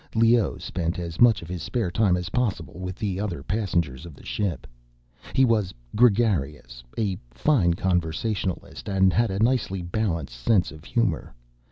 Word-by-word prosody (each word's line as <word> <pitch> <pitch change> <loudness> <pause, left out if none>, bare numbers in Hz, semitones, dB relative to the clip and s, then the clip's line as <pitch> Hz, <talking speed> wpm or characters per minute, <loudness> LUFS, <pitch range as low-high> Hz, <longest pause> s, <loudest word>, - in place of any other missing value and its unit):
Leoh 115 -1 +4
spent 85 -1 -3
as 85 -2 -5
much 115 -6 +6
of - - -9
his 90 -1 -5
spare 115 -8 -1
time 100 -3 +3
as 90 0 -4
possible 95 -8 -2
with 90 0 -4
the 100 -3 -2
other 100 -4 -3
passengers 85 - -1
of 85 -4 -10
the - - -16
ship. 100 -5 -2 0.7
He 135 - +5
was 110 -6 +1 0.2
gregarious, 85 - +2
a 100 -5 -1
fine 85 - +2
conversationalist, 90 +2 -2
and 95 -1 +3
had 115 0 +2
a 95 - -2
nicely 110 -5 +1
balanced 85 - -2
sense 90 - +2
of 80 +1 -13
humor. 115 - -1
95 Hz, 160 wpm, -25 LUFS, 85-110 Hz, 0.7 s, much